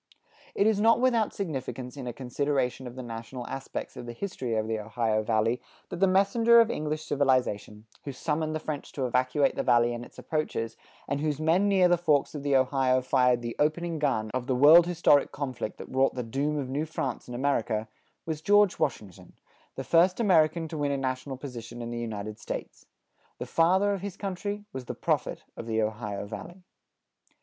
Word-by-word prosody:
It 200 - +3
is 215 -2 +3
not 230 +2 +5
without 240 -4 +2
significance 135 -8 -5
in 135 -3 -7
a - - -2
consideration 130 +1 -2
of 120 - -9
the 130 - -6
national 120 +2 -7
aspects 135 +2 -6
of 120 - -8
the 120 - -5
history 125 - -4
of 110 0 -1
the 110 -1 -1
Ohio 110 0 0
Valley, 110 +2 +1 0.3
that - - -5
the 195 - +5
messenger 225 +5 +5
of 230 0 +4
English 155 -2 -3
civilization, 130 -7 0 0.2
who 140 - -5
summoned 155 +3 -2
the - - -1
French 150 -2 -5
to 135 - -2
evacuate 130 +3 +2
the - - 0
Valley 120 -1 +3
and 120 0 -5
its - - -15
approaches, 155 -7 -3 0.3
and 140 +1 -2
whose 150 -2 -1
men 165 +6 +3
near 190 -2 +5
the 175 -1 +3
forks 150 -5 +2
of 150 - -5
the 140 -1 +1
Ohio 130 -1 +3
fired 125 -1 +2
the 120 0 -4
opening 160 +2 0
gun 110 -7 0
of 130 -1 -3
the 130 - +1
world 155 +6 +8
historic 165 -5 +3
conflict 130 -6 -4
that - - -8
wrought 130 0 +2
the 125 - -2
doom 140 +6 -1
of 140 -3 -2
New 145 +5 -2
France 135 -5 -4
in 125 - -6
America, 120 -5 0 0.4
was 160 -2 -4
George 205 +1 +4
Washington, 105 - -3 0.4
the - - -4
first 180 +4 +3
American 165 -6 +3
to 155 -1 -6
win 145 -1 0
a 140 - 0
national 130 0 -3
position 120 -3 -8
in 120 0 -5
the 120 - -4
United 110 -2 -5
States. - - -7 0.5
The - - -5
father 190 +5 +3
of 195 - -4
his 200 -2 -6
country 205 +1 -4
was 130 -1 -6
the - - -5
prophet - - -1
of 115 - -8
the 110 -1 0
Ohio 105 -2 -2
Valley. 175 - -9
135 Hz, 195 wpm, -28 LUFS, 120-165 Hz, 0.5 s, world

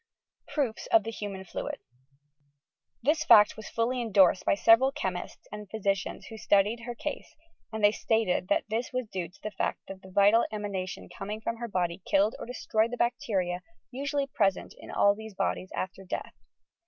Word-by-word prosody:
PROOFS 265 -8 -2
OP 225 - +6
TnB 225 0 -6
nUMAN 195 -2 -5
FLUID - - -5 1.3
This 305 +4 +2
fact 215 -7 +7
was 220 - -9
fully 245 +2 0
endorsed 195 -5 +4
by - - +3
several 230 +6 +5
chemists 190 -11 -5
and 210 -2 -8
physicians 195 -3 -2
who 220 - -9
studied 205 +4 +3
her 240 - -4
case 295 - -6 0.4
and 220 -1 -4
they 205 - +7
stated 220 -4 0
that 200 - +2
this 225 +3 -2
was 255 -1 -2
due 185 -5 -4
to 180 - -22
the 215 - -3
fact - - -2
that 190 -1 -9
the 190 - -13
vital 205 +4 +5
emanation 200 -3 -4
coming 210 +2 -6
from 230 +1 -3
her 235 0 -4
body 180 -3 -1
killed 200 +3 +2
or - - -7
destroyed 225 -2 0
the 245 - -5
bacteria 190 -7 0 0.3
usually 280 +2 -1
present 200 -8 0
in - - -13
all 200 - +4
these 220 -1 -10
bodies 185 - -1
after 190 +1 -4
death. 185 - -5
210 Hz, 180 wpm, -29 LUFS, 195-230 Hz, 1.3 s, fact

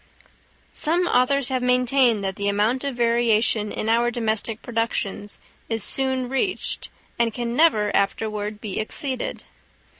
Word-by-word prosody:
Some 345 +4 +1
authors 270 -2 +2
have 260 -1 -1
maintained 250 -3 +2
that 190 -1 -2
the 200 - -3
amount 210 +6 +1
of 280 -2 -3
variation 230 -2 +2
in 215 - -3
our 235 +2 +2
domestic 225 -1 -2
productions 225 -3 -3 0.3
is 225 -2 0
soon 260 -1 +2
reached, 270 +9 -2 0.3
and 235 -1 +2
can 235 +1 -4
never 220 -10 +3
afterward 210 +1 -1
be 205 -3 -4
exceeded. 260 +4 -3
235 Hz, 130 wpm, -23 LUFS, 215-255 Hz, 0.3 s, never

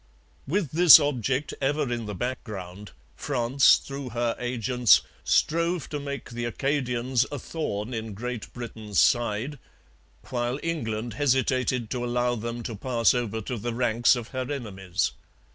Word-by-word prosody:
With 165 -2 -1
this 170 0 +9
object 135 -1 -1
ever 140 -2 0
in 115 -2 -4
the 105 - -5
background, 105 -5 -5 0.3
France, 130 -1 +4
through 140 -1 -6
her 120 0 -1
agents, 125 -1 +3 0.2
strove 170 0 +1
to 145 - -3
make 140 -2 -6
the 120 0 -4
Acadians 125 -1 0
a 145 - -3
thorn 125 -7 -4
in 110 -2 -5
Great 120 +1 -5
Britain's 110 -4 -6
side, 120 - +2 0.7
while 120 +1 -1
England 120 -9 -3
hesitated 130 -2 +1
to 125 -1 -2
allow 120 0 0
them 120 +1 -4
to 115 - -5
pass 115 +1 +2
over 115 -3 -2
to 120 +3 -4
the 120 +2 -3
ranks 120 0 +3
of 120 -2 -6
her 130 +1 -4
enemies. 95 -9 -2
120 Hz, 145 wpm, -26 LUFS, 115-135 Hz, 0.7 s, this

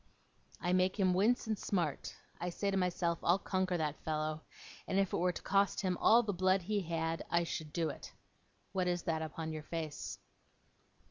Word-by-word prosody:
'I 175 +2 0
make 185 +2 +2
him 185 -2 +4
wince, 220 +8 +3
and 220 -2 -1
smart. 170 -8 -1 0.2
I 175 - -2
say 200 +3 -1
to - - 0
myself, 175 -2 0
"I'll 175 - +4
conquer 185 -2 0
that 155 -2 -2
fellow"; 155 0 -1 0.5
and 190 - 0
if 195 -2 +2
it - - +2
were 180 +1 +2
to - - -7
cost 200 +1 +2
him 185 -2 0
all 235 +2 +6
the 205 -2 -1
blood 185 +1 +2
he 205 +2 0
had, 165 -1 -2
I 170 0 +3
should 160 -2 -4
do 165 -1 0
it. - - -8 0.6
What 185 -2 0
is 175 -1 0
that 160 -2 0
upon 160 +1 -4
your 155 - -4
face? 155 -1 -5
180 Hz, 195 wpm, -34 LUFS, 165-190 Hz, 0.6 s, all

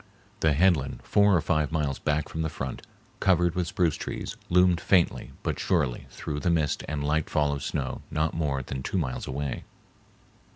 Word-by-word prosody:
The 80 -2 +3
head 90 +5 +5
land 70 -2 -5
four 100 -1 +4
or 85 - +3
five 75 -3 +1
miles 75 -4 -1
back 75 0 0
from 80 - -4
the 80 - 0
front, 65 -3 -5 0.4
covered 90 -2 +3
with 90 -1 -1
spruce 85 -2 +1
trees, - - -5
loomed 90 -1 +4
faintly 90 -4 +2
but - - -2
surely 75 -10 0
through 75 - -5
the 85 - 0
mist 80 -4 +1
and 75 -1 -2
light 75 +1 0
fall 75 -1 +2
of 70 - -4
snow 65 -4 -3
not 80 0 0
more 70 -5 -1
than 65 +1 -5
two 95 - -2
miles 65 -8 -2
away. 70 -1 -3
75 Hz, 190 wpm, -27 LUFS, 70-85 Hz, 0.4 s, head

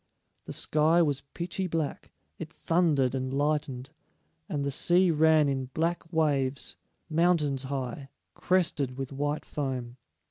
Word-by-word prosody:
The - - -6
sky 160 +3 +3
was 145 -4 0
pitchy 180 +2 -3
black; 160 -4 -3 0.3
it 160 -1 -6
thundered 160 -8 +1
and 130 -1 -2
lightened, 140 -2 -1 0.6
and 145 -2 -2
the 140 - -1
sea 175 +6 +3
ran 155 -1 +4
in 135 -1 -1
black 165 0 -1
waves, 145 -5 0 0.3
mountains 155 -5 +2
high, 135 0 -4 0.2
crested 150 -8 0
with 135 0 -5
white 145 +2 -2
foam. 130 -4 -4
145 Hz, 130 wpm, -28 LUFS, 135-165 Hz, 0.6 s, ran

